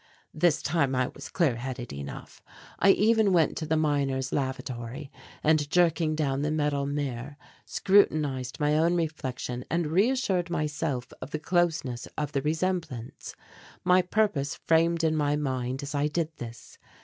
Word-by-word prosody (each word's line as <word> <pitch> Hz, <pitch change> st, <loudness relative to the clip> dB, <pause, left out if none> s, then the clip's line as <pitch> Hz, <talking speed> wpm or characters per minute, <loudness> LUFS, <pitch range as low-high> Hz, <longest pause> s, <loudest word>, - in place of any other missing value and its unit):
This 160 Hz, 0 st, +2 dB
time 145 Hz, -4 st, +1 dB
I 125 Hz, 0 st, +1 dB
was -, -, -10 dB
clear 150 Hz, -10 st, +1 dB
headed 125 Hz, -, -5 dB
enough. 70 Hz, 0 st, -8 dB, 0.4 s
I 195 Hz, -, +5 dB
even 215 Hz, +1 st, +4 dB
went 165 Hz, -3 st, +3 dB
to 155 Hz, -, -3 dB
the 160 Hz, 0 st, +2 dB
miners' 140 Hz, -4 st, 0 dB
lavatory 130 Hz, 0 st, -4 dB, 0.3 s
and, 155 Hz, -2 st, +3 dB
jerking 165 Hz, -2 st, +2 dB
down 140 Hz, -3 st, 0 dB
the 150 Hz, -, 0 dB
metal 145 Hz, -2 st, 0 dB
mirror, 140 Hz, -1 st, -4 dB, 0.3 s
scrutinized 150 Hz, -10 st, +2 dB
my 150 Hz, 0 st, +2 dB
own 165 Hz, +3 st, +3 dB
reflection 130 Hz, -7 st, -3 dB
and 170 Hz, +1 st, 0 dB
reassured 190 Hz, -, +1 dB
myself 150 Hz, -5 st, -2 dB
of 130 Hz, -, -6 dB
the 155 Hz, -, -2 dB
closeness 155 Hz, -8 st, 0 dB
of 150 Hz, -2 st, -2 dB
the 140 Hz, -, 0 dB
resemblance. 160 Hz, -5 st, -3 dB, 0.5 s
My 180 Hz, +1 st, +5 dB
purpose 180 Hz, -7 st, 0 dB
framed 165 Hz, 0 st, +2 dB
in 160 Hz, -1 st, +2 dB
my 145 Hz, -1 st, +1 dB
mind 130 Hz, -2 st, -2 dB
as 140 Hz, +1 st, -5 dB
I 145 Hz, +1 st, +1 dB
did 160 Hz, +1 st, -2 dB
this. 115 Hz, -1 st, -10 dB
150 Hz, 150 wpm, -28 LUFS, 135-165 Hz, 0.5 s, I